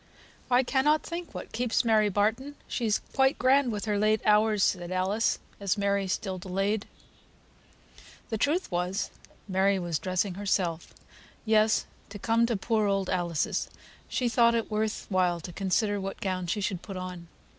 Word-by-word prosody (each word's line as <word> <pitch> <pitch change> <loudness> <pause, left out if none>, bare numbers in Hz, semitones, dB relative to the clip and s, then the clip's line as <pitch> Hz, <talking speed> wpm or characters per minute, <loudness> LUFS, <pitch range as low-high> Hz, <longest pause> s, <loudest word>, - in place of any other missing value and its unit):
"I 250 +1 +4
cannot 290 +4 +2
think 340 0 -6
what - - -7
keeps 240 0 0
Mary 215 -2 +4
Barton. 220 +8 0
She's 225 -4 0
quite 265 0 +3
grand 260 0 +3
with 210 0 -3
her 210 -2 0
late 215 +1 +3
hours," 210 -1 +4
said 175 -1 0
Alice, 190 +5 +1 0.2
as 200 0 0
Mary 200 -1 +1
still 185 0 -2
delayed. 195 +3 -1 1.4
The 220 - 0
truth 305 - 0
was, 180 +3 -1 0.4
Mary 195 +1 +2
was 175 -4 -2
dressing 185 +1 -1
herself; 180 -4 -1 0.5
yes, 215 0 +3 0.2
to 205 - -8
come 230 +3 +2
to 230 -3 0
poor 215 +1 +1
old 195 -1 0
Alice's 175 -4 -1 0.4
she 250 - 0
thought 235 0 +4
it 230 -1 -2
worth 215 0 -1
while 180 -3 +2
to 175 +2 -8
consider 200 +2 0
what 195 0 -5
gown 185 -2 -2
she 205 +5 -1
should 190 -3 -2
put 195 -2 -7
on. 180 -2 -7
205 Hz, 160 wpm, -28 LUFS, 185-225 Hz, 1.4 s, I